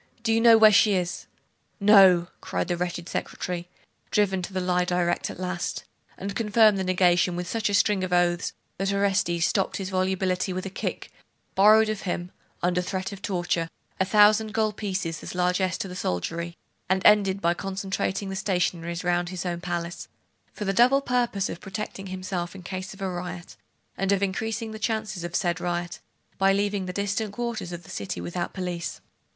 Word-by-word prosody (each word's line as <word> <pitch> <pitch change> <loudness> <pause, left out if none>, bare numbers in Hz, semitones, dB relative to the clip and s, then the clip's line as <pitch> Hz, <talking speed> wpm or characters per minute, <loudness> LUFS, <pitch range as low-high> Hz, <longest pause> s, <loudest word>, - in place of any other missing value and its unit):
Do 225 -1 +2
you 225 - +3
know 230 -1 +8
where 215 -1 +8
she 205 0 +5
is?' 180 0 -2 0.5
'No!' 190 -4 +6
cried - - -3
the 175 - +1
wretched 175 0 -3
secretary, 175 0 -4 0.4
driven 195 -3 +2
to 180 - -6
the 190 - -2
lie 180 0 +1
direct 175 -1 0
at - - -8
last; 185 -1 -3 0.3
and 200 +1 -5
confirmed 215 -2 +4
the - - 0
negation 180 -1 +3
with 175 0 -4
such 220 +1 -1
a - - -2
string 200 -1 +3
of 185 - -3
oaths, 175 -1 +2 0.3
that 195 0 0
Orestes 190 -4 +1
stopped 195 -1 0
his 195 0 -5
volubility 185 0 0
with 185 +1 -4
a 195 - -5
kick, - - -4 0.4
borrowed 215 +3 +6
of 215 -2 -2
him, 175 -1 -3 0.3
under 180 0 +2
threat 185 +1 -3
of 200 -1 -9
torture, 175 -5 -1 0.3
a - - +4
thousand 210 +2 +4
gold 215 -1 +1
pieces 185 -6 -3
as - - -7
largess 180 0 +1
to - - -4
the 180 - -8
soldiery, 170 - -3 0.3
and 190 0 +1
ended 200 -2 +5
by 170 -2 +2
concentrating 195 +1 -3
the 195 - -4
stationaries 180 -3 -1
round 175 0 +1
his 185 -1 -5
own 175 -1 -3
palace, 175 -1 -4 0.4
for 210 - -6
the 195 - 0
double 255 +6 +5
purpose 240 -7 0
of - - -7
protecting 195 0 -6
himself 185 -1 -4
in 185 - -10
case 185 +2 -5
of 195 - -15
a - - 0
riot, 175 -1 -6 0.4
and 195 +1 0
of 200 0 +2
increasing 220 +3 -2
the 220 - -7
chances 215 -4 -2
of 175 0 -5
the - - +2
said 175 -1 -1
riot, 175 0 -3 0.4
by 195 0 +5
leaving 200 -1 0
the - - -3
distant 200 +2 -2
quarters 235 -5 -4
of 175 0 -7
the - - -12
city 100 -3 -4
without 85 - -3
police. 180 -3 -4
190 Hz, 190 wpm, -26 LUFS, 175-200 Hz, 0.5 s, know